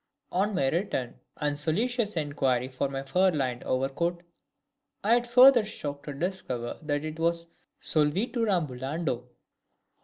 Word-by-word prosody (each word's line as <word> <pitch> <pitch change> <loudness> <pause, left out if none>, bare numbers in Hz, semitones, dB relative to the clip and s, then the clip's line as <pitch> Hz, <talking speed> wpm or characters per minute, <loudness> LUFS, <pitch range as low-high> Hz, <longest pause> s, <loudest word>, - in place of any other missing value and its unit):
On 200 +3 +1
my 135 - +2
return 160 - -1 0.2
and 145 -1 -1
solicitous 215 +6 0
inquiry 135 -5 0
for 135 +1 -2
my 135 0 -4
fur 185 +7 +3
lined 130 -7 -1
overcoat, 170 +7 -1 0.8
I 215 +3 +4
had 240 0 +3
the - - -14
further 250 0 +8
shock 145 -9 -6
to 145 - -5
discover 140 -8 -3
that 145 -1 -2
it 155 +1 -6
was 170 0 +1 0.3
solvitur 200 - +1
ambulando! 140 -5 -1
155 Hz, 135 wpm, -28 LUFS, 135-190 Hz, 0.8 s, further